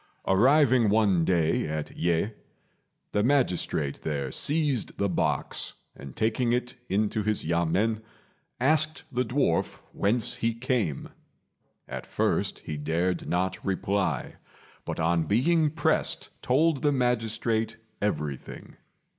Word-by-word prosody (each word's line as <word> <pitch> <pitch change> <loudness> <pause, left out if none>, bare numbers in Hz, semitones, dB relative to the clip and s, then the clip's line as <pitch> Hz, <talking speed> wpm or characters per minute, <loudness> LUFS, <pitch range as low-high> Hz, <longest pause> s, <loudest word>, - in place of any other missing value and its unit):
Arriving 125 +2 +4
one 100 -5 +3
day 80 -3 +2
at 75 -1 -4
Yeh, 85 +4 +1 0.8
the 105 - +1
magistrate 105 - +1
there 70 -4 -2
seized 145 - 0
the 100 - +1
box, 90 - -1 0.2
and 70 -2 -10
taking 115 +2 +1
it 125 0 -1 0.2
into 105 +2 +1
his 105 -3 -1
yamên 85 +7 +1 0.6
asked 155 +4 +2
the 125 -1 +1
dwarf 120 - 0 0.2
whence 110 +3 0
he 115 0 0
came. 115 - -1 0.8
At - - -6
first - - 0
he 75 - -4
dared 85 +4 -1
not 90 +1 -1
reply, 95 -6 -1 0.5
but - - -4
on 85 0 +2
being 155 +9 +3
pressed 150 0 0
told 145 +2 +2
the 145 - +3
magistrate 115 -3 0 0.2
everything. 75 -9 -4
110 Hz, 115 wpm, -27 LUFS, 85-125 Hz, 0.8 s, Arriving